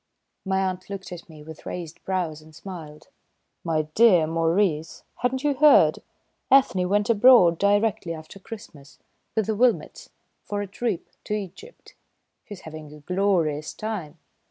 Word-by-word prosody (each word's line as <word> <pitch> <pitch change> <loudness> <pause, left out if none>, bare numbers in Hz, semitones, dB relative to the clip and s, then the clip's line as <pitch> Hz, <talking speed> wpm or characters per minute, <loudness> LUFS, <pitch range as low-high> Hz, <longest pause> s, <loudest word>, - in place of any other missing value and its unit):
My 190 0 +1
aunt 185 0 -6
looked 195 -2 -7
at 175 -1 -9
me 155 -2 -13
with 160 0 -11
raised 170 -3 -7
brows 175 -5 -2
and 155 0 -17
smiled. 155 -4 -10 0.5
"My 160 -2 0
dear 195 -7 +5
Maurice, 165 0 0
hadn't 260 +2 -1
you 295 -1 +2
heard? 295 +2 +5 0.5
Ethne 185 -10 +4
went 205 +3 +2
abroad 210 -7 +6
directly 205 -2 +1
after 160 +5 -12
Christmas, 160 -9 -12 0.4
with 220 - +1
the 220 - -1
Wilmotts, 225 -7 0 0.3
for 205 0 -3
a - - -4
trip 200 -1 -3 0.2
to 210 - -2
Egypt. 210 - -9 0.5
She's 205 -3 -10
having 155 -2 -10
a 150 0 -13
glorious 170 -4 0
time!" 190 -8 -5
185 Hz, 145 wpm, -24 LUFS, 160-210 Hz, 0.5 s, abroad